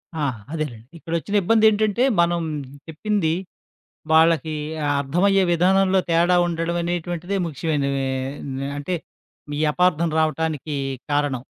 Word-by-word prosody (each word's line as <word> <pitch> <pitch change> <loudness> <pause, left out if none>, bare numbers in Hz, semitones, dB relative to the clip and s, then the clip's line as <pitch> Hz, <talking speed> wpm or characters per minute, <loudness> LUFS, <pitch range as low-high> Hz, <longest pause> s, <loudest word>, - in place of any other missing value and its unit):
ఆ! 155 - -2 0.3
అదేలేండి. 125 -8 -4
ఇక్కడొచ్చినిబ్బందేంటంటే, 210 +6 +2 0.2
మనం 170 0 +1 0.5
చెప్పింది 165 0 0 0.8
వాళ్ళకీ 160 -1 +4 0.3
అ - - +1
అర్థమయ్యే 190 +7 +2
విధానంలో 190 +2 +3
తేడా 170 +2 +3
ఉండడవనేటువంటిది 175 +2 -2
ముఖ్యమైనవే 140 -3 -1 0.5
నె 135 +1 -3
అంటే, 175 +5 -2 0.6
ఈ - - 0
అపార్థం 170 -2 +2
రావటానికీ 155 -2 -1 0.3
కారణం. 145 -4 0
165 Hz, 95 wpm, -22 LUFS, 155-185 Hz, 0.8 s, వాళ్ళకీ